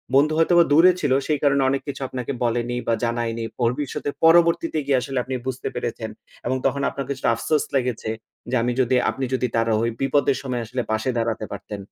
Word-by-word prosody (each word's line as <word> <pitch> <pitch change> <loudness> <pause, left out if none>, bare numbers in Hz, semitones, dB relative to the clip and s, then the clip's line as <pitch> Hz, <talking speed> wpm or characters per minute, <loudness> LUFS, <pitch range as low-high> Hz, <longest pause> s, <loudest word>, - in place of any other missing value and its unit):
বন্ধু 150 +3 +4
হয়তোবা 170 +1 +5
দূরে 170 +5 +7
ছিল 145 - 0 0.2
সেই 150 -2 +1
কারণে 140 -1 +3
অনেক 135 0 0
কিছু 140 -1 -5
আপনাকে 125 +1 -4
বলেনি 120 +1 0
বা 115 - +3
জানায়নি। 115 -1 -1
ভবিষ্যতে 125 +4 -1
পরবর্তীতে 165 -1 +4
গিয়ে 135 -2 +3
আসলে 135 -1 -4
আপনি 130 0 -4
বুঝতে 130 -1 -3
পেরেছেন - - -4 0.4
এবং 130 +2 0
তখন 140 +1 +1
আপনার 140 - -5
কিছুটা 135 -3 0
আফসোস 150 +6 0
লেগেছে 125 -4 -1 0.4
যে 130 - 0
আমি 120 - +1
যদি 130 +1 +2
আপনি 135 - -2
যদি 125 -1 +1
তার 115 0 +2 0.2
ওই 115 - 0
বিপদের 135 0 +2
সময় 125 -3 -3
আসলে 125 +3 -3
পাশে 110 +4 0
দাঁড়াতে 115 -2 -1
পারতেন। 105 -1 -7
130 Hz, 190 wpm, -23 LUFS, 120-140 Hz, 0.4 s, দূরে